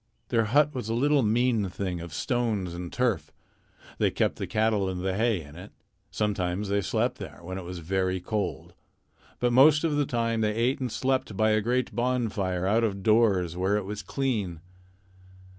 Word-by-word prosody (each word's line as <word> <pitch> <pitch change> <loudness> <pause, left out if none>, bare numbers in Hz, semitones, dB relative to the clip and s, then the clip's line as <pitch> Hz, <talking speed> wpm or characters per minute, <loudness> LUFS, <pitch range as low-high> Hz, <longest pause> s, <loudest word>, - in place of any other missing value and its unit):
Their 115 -2 +2
hut 145 +6 +3
was 125 -5 -4
a 115 - 0
little 145 +3 +3
mean 115 -2 +2
thing 90 -2 -4
of 85 -1 -8
stones 105 - -1
and 85 0 -6
turf. 100 -12 0 0.7
They - - +3
kept - - 0
the - - -4
cattle 110 -3 +1
and 90 -1 -4
the 95 -1 0
hay 110 -3 +1
in 75 +1 -14
it. 90 +4 -10 0.4
Sometimes 100 -2 -1
they 100 0 +1
slept - - -1
there, - - -8
when 95 +2 -5
it - - -7
was 90 +1 -7
very 95 +2 -1
cold. 100 +1 -3 0.7
But 120 -1 +1
most 150 +4 +6
of 155 -3 +1
the 145 -2 +1
time 115 -2 0
they 105 -1 +1
ate 125 +5 +1
and 130 -3 -3
slept 130 -6 -1
by 110 0 +3
a 110 0 +3
great 125 +3 0
bonfire 110 -7 -1
out 110 +4 +2
of 100 -3 -1
doors 100 -6 +3
where 95 +3 +1
it 105 - -3
was 105 +1 -5
clean. 100 - -2
105 Hz, 190 wpm, -27 LUFS, 95-120 Hz, 0.7 s, most